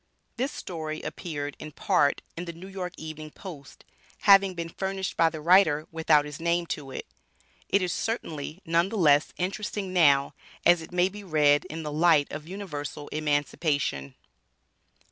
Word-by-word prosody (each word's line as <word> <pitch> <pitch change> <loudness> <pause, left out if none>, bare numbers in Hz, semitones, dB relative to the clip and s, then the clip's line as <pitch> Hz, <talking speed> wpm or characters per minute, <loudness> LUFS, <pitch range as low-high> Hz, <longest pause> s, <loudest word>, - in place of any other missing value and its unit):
This 260 +4 -1
story 155 -3 -6
appeared 145 -4 -5
in 155 -1 -8
part 140 0 +2
in 175 - -5
the 170 -1 -7
N.Y. 185 +1 -6
Evening 155 -1 -7
Post, 150 -5 -11 0.4
having 195 -2 +6
been 170 -1 -4
furnished 190 +1 -3
by 165 0 +4
the 160 - -7
writer, 160 -3 +5
without 160 -2 +3
his 150 -1 -8
name 170 +1 +1
to 140 -3 -9
it. 130 - -6 0.6
It 200 -1 +3
is 180 - -1
certainly 165 -6 -4
none 170 +3 +2
the 220 - -4
less 150 -5 +4
interesting 195 +1 -3
now, 140 -6 +4 0.3
as 175 -1 +6
it 160 - -10
may 180 0 +3
be 205 +2 -9
read 150 -5 +3
in 160 +1 -6
the 150 - -4
light 155 -1 +3
of 150 +1 -7
Universal 150 -6 -6
Emancipation. 145 - -1
165 Hz, 160 wpm, -27 LUFS, 150-185 Hz, 0.6 s, having